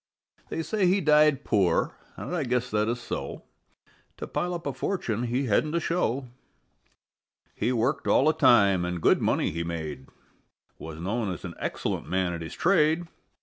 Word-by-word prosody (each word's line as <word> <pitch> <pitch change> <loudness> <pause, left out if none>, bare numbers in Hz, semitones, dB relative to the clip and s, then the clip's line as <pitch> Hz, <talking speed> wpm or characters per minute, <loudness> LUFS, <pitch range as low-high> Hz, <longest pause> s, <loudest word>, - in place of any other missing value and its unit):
They 165 - -3
say 205 +1 +1
he 190 +3 +3
died 150 -4 +4
poor, 95 -6 +1 0.2
and 180 - -4
I 165 - 0
guess 125 -1 -1
that 105 0 +1
is 120 +1 -2
so: 120 - -5 0.7
To - - -5
pile 180 0 -2
up 170 - -7
a 140 - -2
fortune 125 - -2
he 125 +3 -1
hadn't 150 +8 +1
a - - +3
show; 140 -6 -1 1.3
He - - -1
worked 125 +4 0
all 135 - +4
the 155 - +4
time 100 - +4
and 90 0 -3
good - - +3
money - - +1
he 85 +2 -3
made, 80 -5 -5 0.7
Was 80 -1 -8
known 100 +3 -2
as 90 - -7
an - - -6
excellent - - -3
man 95 -1 0
at 85 - -5
his 80 - -7
trade. 170 -2 +3
120 Hz, 175 wpm, -27 LUFS, 95-155 Hz, 1.3 s, died